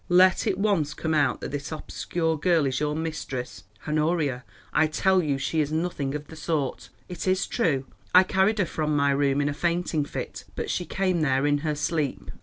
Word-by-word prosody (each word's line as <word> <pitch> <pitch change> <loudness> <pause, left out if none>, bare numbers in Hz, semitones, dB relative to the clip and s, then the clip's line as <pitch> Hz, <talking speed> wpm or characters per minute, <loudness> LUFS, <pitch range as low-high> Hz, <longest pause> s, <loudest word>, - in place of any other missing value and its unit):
Let 185 +3 +5
it 195 -3 +1
once 195 -8 +1
come 160 -1 -2
out 150 -2 +2
that - - -5
this 145 +1 -4
obscure 160 +1 -2
girl 165 0 +2
is 130 -1 0
your 150 0 0
mistress——" 130 -10 -5 0.2
"Honoria, 150 -4 0 0.3
I 160 - +4
tell 190 +4 +2
you 145 -4 0
she 160 +4 -1
is 150 0 -2
nothing 155 -4 -1
of 150 0 -5
the 160 - -12
sort. 150 -3 -2 0.2
It 180 0 -5
is 185 +1 +2
true 145 - 0 0.3
I 185 - +8
carried 190 +3 +2
her 200 - +2
from 155 -2 -1
my 140 -1 +3
room 140 0 +2
in 145 - +1
a 145 - 0
fainting 170 -1 0
fit, - - -6
but - - -3
she 180 - -2
came 185 -3 0
there 135 -2 +2
in 145 0 +2
her 150 0 -1
sleep." 145 -1 -2
155 Hz, 205 wpm, -26 LUFS, 145-175 Hz, 0.3 s, I